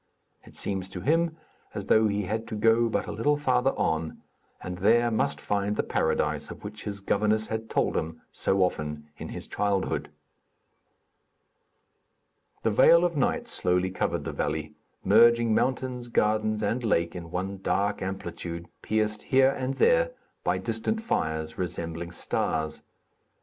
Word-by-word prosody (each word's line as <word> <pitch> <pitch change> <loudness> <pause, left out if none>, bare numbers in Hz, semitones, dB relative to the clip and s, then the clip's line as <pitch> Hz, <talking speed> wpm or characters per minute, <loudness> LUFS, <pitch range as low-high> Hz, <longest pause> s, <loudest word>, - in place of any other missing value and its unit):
It - - -16
seems 95 -2 -2
to 95 -2 -6
him 165 - +1 0.4
as - - -3
though 110 0 +4
he 105 0 -1
had 110 +4 -3
to 110 - -5
go 115 +2 +3
but - - -1
a - - -5
little 145 +6 +1
farther 130 -2 +2
on 80 0 -1 0.4
and 90 -1 -6
there 120 +4 +4
must 110 - 0
find 100 0 -1
the - - 0
Paradise - - 0
of - - -10
which 105 +1 -7
his 100 -1 -4
governess 105 +2 +1
had 110 0 -4
told - - +1
him 80 0 -3
so 95 0 +1
often 75 -3 -3
in - - -6
his - - -7
childhood. 100 -2 -1 2.5
The 115 - +2
veil 165 +10 +6
of 170 -2 -1
night 140 - 0
slowly 90 +1 +1
covered 95 - -1
the - - -4
valley, 75 +1 -2 0.3
merging 115 +1 +5
mountains, 130 0 0
gardens 110 -1 +1
and 115 +4 0
lake 85 -6 +1
in 85 -2 -7
one 95 +3 -3
dark 100 +1 0
amplitude, 90 -3 -5
pierced 110 0 0
here 135 0 +4
and 135 0 -3
there - - +3 0.3
by - - +1
distant 225 0 -2
fires, 80 - -2
resembling 85 -1 -3
stars. 80 -2 -2
105 Hz, 150 wpm, -27 LUFS, 90-120 Hz, 2.5 s, veil